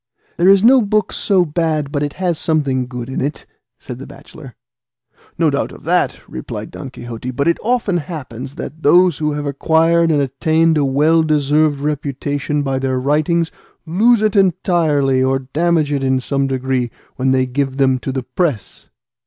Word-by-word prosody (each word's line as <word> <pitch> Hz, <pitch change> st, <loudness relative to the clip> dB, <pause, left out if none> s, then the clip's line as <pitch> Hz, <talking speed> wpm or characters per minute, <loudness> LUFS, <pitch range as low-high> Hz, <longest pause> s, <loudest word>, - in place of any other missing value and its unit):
"There 175 Hz, +2 st, +4 dB
is 195 Hz, 0 st, +5 dB
no 255 Hz, +2 st, +6 dB
book 210 Hz, -1 st, 0 dB
so 190 Hz, -4 st, +2 dB
bad 155 Hz, -2 st, -1 dB
but 145 Hz, -, -2 dB
it 145 Hz, -1 st, -2 dB
has 180 Hz, -4 st, -2 dB
something 140 Hz, -6 st, 0 dB
good 125 Hz, -1 st, -6 dB
in 130 Hz, -, -4 dB
it," 145 Hz, +3 st, -4 dB, 0.3 s
said 125 Hz, 0 st, -9 dB
the 135 Hz, -, -9 dB
bachelor. 135 Hz, -7 st, -13 dB, 0.8 s
"No 160 Hz, -3 st, +2 dB
doubt 140 Hz, -, -2 dB
of -, -, -13 dB
that," -, -, 0 dB
replied 65 Hz, -, -7 dB
Don -, -, -8 dB
Quixote; 120 Hz, +1 st, -7 dB
"but 135 Hz, +4 st, -1 dB
it 170 Hz, -, +2 dB
often 225 Hz, -5 st, 0 dB
happens 140 Hz, -5 st, -7 dB
that 155 Hz, +4 st, -8 dB
those 175 Hz, +1 st, +4 dB
who 150 Hz, -1 st, -1 dB
have 145 Hz, 0 st, -4 dB
acquired 165 Hz, +4 st, +2 dB
and 150 Hz, -2 st, +2 dB
attained 160 Hz, +4 st, +1 dB
a 150 Hz, -, +2 dB
well 150 Hz, +5 st, +3 dB
deserved 150 Hz, -1 st, +1 dB
reputation 145 Hz, 0 st, -2 dB
by 135 Hz, -1 st, -1 dB
their 130 Hz, -1 st, -1 dB
writings, 155 Hz, +5 st, +1 dB, 0.3 s
lose 215 Hz, +7 st, +3 dB
it 215 Hz, -1 st, +1 dB
entirely, 160 Hz, -8 st, +2 dB
or 130 Hz, +1 st, +2 dB
damage 155 Hz, +3 st, 0 dB
it 140 Hz, -2 st, -1 dB
in 130 Hz, 0 st, +1 dB
some 135 Hz, +1 st, -1 dB
degree, 130 Hz, -2 st, -1 dB, 0.3 s
when 130 Hz, +1 st, 0 dB
they 130 Hz, 0 st, +2 dB
give 135 Hz, +1 st, -2 dB
them 130 Hz, -2 st, +2 dB
to 135 Hz, -, -4 dB
the 130 Hz, -1 st, -3 dB
press." 130 Hz, -, -3 dB
145 Hz, 180 wpm, -17 LUFS, 135-165 Hz, 0.8 s, no